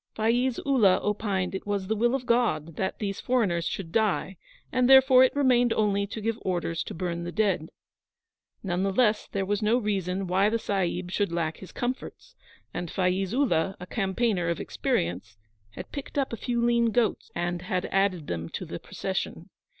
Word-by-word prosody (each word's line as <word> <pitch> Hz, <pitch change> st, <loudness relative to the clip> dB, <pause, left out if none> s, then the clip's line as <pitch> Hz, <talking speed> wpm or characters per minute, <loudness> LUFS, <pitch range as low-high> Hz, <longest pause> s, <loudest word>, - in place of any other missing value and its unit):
Faiz 240 Hz, +3 st, +1 dB
Ullah 215 Hz, -10 st, +4 dB
opined 200 Hz, -3 st, -1 dB
it 190 Hz, -, -5 dB
was 200 Hz, -2 st, -1 dB
the 220 Hz, +3 st, -1 dB
will 240 Hz, +4 st, +2 dB
of 260 Hz, -2 st, -4 dB
God 230 Hz, -11 st, +1 dB
that 190 Hz, +2 st, -2 dB
these 200 Hz, -2 st, -3 dB
foreigners 200 Hz, -10 st, +1 dB
should 170 Hz, -4 st, -4 dB
die, 205 Hz, -2 st, +1 dB, 0.4 s
and 255 Hz, 0 st, +2 dB
therefore 265 Hz, -1 st, +8 dB
it 260 Hz, -, +2 dB
remained 250 Hz, -4 st, +3 dB
only 200 Hz, -2 st, +1 dB
to 215 Hz, -, -6 dB
give 225 Hz, +1 st, -2 dB
orders 170 Hz, -3 st, -2 dB
to -, -, -7 dB
burn 170 Hz, 0 st, -3 dB
the 175 Hz, -, -4 dB
dead. 190 Hz, -6 st, 0 dB, 0.9 s
None 180 Hz, -2 st, -1 dB
the 195 Hz, 0 st, +1 dB
less 215 Hz, 0 st, +2 dB
there 195 Hz, -1 st, -2 dB
was 205 Hz, +2 st, -1 dB
no 215 Hz, +3 st, +3 dB
reason 195 Hz, -4 st, -1 dB
why 190 Hz, +3 st, +3 dB
the 230 Hz, -, +1 dB
Sahib 185 Hz, -4 st, -2 dB
should 200 Hz, -2 st, 0 dB
lack 165 Hz, -2 st, -1 dB
his 190 Hz, -, -11 dB
comforts, 255 Hz, -, -5 dB, 0.4 s
and 175 Hz, -, -4 dB
Faiz 185 Hz, +1 st, 0 dB
Ullah, 195 Hz, -, +1 dB
a 180 Hz, -, -7 dB
campaigner 195 Hz, -2 st, 0 dB
of 170 Hz, -, -1 dB
experience, 95 Hz, +5 st, -2 dB, 0.4 s
had -, -, -8 dB
picked 280 Hz, 0 st, -7 dB
up 270 Hz, -4 st, 0 dB
a -, -, 0 dB
few 235 Hz, +1 st, -1 dB
lean 235 Hz, 0 st, +3 dB
goats 230 Hz, -1 st, 0 dB
and 175 Hz, 0 st, -2 dB
had 180 Hz, 0 st, -2 dB
added 190 Hz, -5 st, +1 dB
them 85 Hz, -, -4 dB
to -, -, -5 dB
the -, -, -6 dB
procession. -, -, -4 dB
200 Hz, 185 wpm, -27 LUFS, 180-235 Hz, 0.9 s, therefore